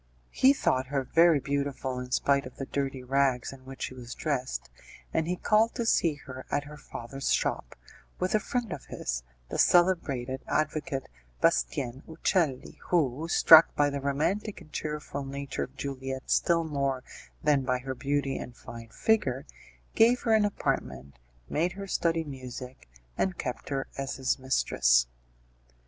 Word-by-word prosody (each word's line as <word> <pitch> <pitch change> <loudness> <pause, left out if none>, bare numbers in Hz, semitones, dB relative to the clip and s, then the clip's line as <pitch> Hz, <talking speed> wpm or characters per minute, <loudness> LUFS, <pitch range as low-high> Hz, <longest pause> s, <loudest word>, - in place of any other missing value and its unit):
He 265 - +5
thought 130 - +1
her 135 0 -1
very 165 +3 +5
beautiful 140 -2 -2
in 125 0 -6
spite 140 +1 +2
of 130 - -13
the 135 - -5
dirty 135 -1 -3
rags 135 -1 +1
in 130 -1 -14
which 135 -1 -7
she - - -4
was 125 -1 -8
dressed, 130 - -3 0.4
and 160 - +1
he 180 - 0
called 215 +5 +2
to 235 - -1
see 165 -8 +3
her 130 -1 -8
at 145 - 0
her 150 +1 -10
father's 135 -1 -5
shop, - - 0 0.4
with 185 0 -1
a 215 - +4
friend 235 -3 -2
of 140 - -8
his, 60 -1 -3 0.3
the - - -3
celebrated 140 -8 +3
advocate, 150 -3 -1 0.3
Bastien 120 - +1
Uccelli, 160 -4 0
who; 155 -3 +1
struck 165 -1 +8
by 145 -1 +3
the 140 0 -3
romantic 160 +10 -1
and 160 -4 -16
cheerful 150 -2 -4
nature 140 +1 -4
of 130 +2 -21
Juliette 135 -1 -5
still 170 -1 +3
more 140 -4 -1 0.4
than 150 -3 +4
by 125 -1 0
her 130 +1 -5
beauty 140 +1 -1
and 120 -1 -8
fine 115 -1 -10
figure, 135 - +1 0.5
gave 240 +2 +5
her 225 - +2
an 215 -1 +5
apartment, 65 - -3 0.3
made 175 +4 0
her 200 +1 -6
study 165 -3 0
music, 130 - -9 0.3
and 190 -2 0
kept 125 -3 -5
her 135 -1 -1
as 135 0 -3
his 130 0 0
mistress. - - +3
140 Hz, 160 wpm, -29 LUFS, 130-160 Hz, 0.5 s, struck